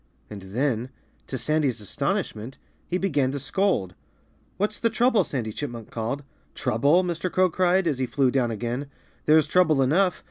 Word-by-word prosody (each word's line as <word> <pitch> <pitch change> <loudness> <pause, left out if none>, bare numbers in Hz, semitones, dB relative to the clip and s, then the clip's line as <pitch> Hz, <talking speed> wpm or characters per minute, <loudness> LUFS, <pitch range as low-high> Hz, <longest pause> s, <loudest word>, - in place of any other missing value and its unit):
And 105 -2 -7
then 120 +5 -1 0.4
to 130 - -4
Sandy's 140 -2 0
astonishment 110 +4 -3 0.3
he 180 - 0
began 145 -9 +1
to 140 - -3
scold. 140 - 0 0.6
"What's 210 +2 -1
the 230 - +2
trouble?" 235 0 +3
Sandy 115 -6 -4
Chipmunk 120 -5 -6
called. 120 +6 -3 0.3
"Trouble?" 145 +11 +3
Mr. 175 0 -2
Crow 185 -1 +3
cried, 185 +2 +2
as 145 -6 0
he 130 - 0
flew 135 -1 +2
down 125 -3 +1
again. 120 +5 -3 0.4
"There's 155 0 +6
trouble 160 -6 +3
enough. 180 +8 +2
140 Hz, 155 wpm, -25 LUFS, 120-180 Hz, 0.6 s, There's